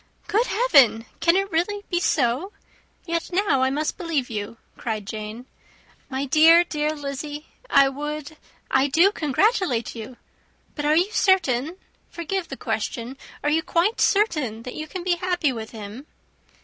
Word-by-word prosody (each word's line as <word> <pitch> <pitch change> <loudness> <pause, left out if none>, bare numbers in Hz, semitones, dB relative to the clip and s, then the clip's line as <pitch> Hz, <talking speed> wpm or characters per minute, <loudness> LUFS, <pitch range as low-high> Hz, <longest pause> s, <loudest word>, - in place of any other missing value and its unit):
"Good 445 +5 +1
heaven! 275 - +4
can 335 +1 +4
it 390 +1 0
be 325 - +3
really 410 +4 -3 0.2
so? 290 - 0 0.5
Yet 335 -1 -2
now 360 -8 +2
I 260 - +3
must 300 +3 -2
believe 315 -9 -2
you," 210 +1 -5 0.2
cried 215 -3 -4
Jane. 215 +3 -7 0.6
"My 270 +1 -2
dear, 320 +5 +6
dear 305 -2 -2
Lizzy, 290 +1 -6 0.2
I 275 -1 +6
would, 295 +2 -5 0.4
I 265 +1 +3
do 335 +8 +4
congratulate 320 - +1
you; 230 +2 -9 0.6
but 295 - -4
are 300 +1 +4
you 360 +6 +2
certain 330 - +2 0.3
forgive 345 +2 -3
the - - -7
question 240 +2 -3 0.3
are 295 - +1
you 320 +2 +2
quite 355 +6 0
certain 300 - +1
that 250 - -7
you 310 - -6
can 365 +2 -6
be 355 -1 +1
happy 355 -6 0
with 220 -2 -6
him?" 220 +5 -9
300 Hz, 155 wpm, -23 LUFS, 255-350 Hz, 0.6 s, dear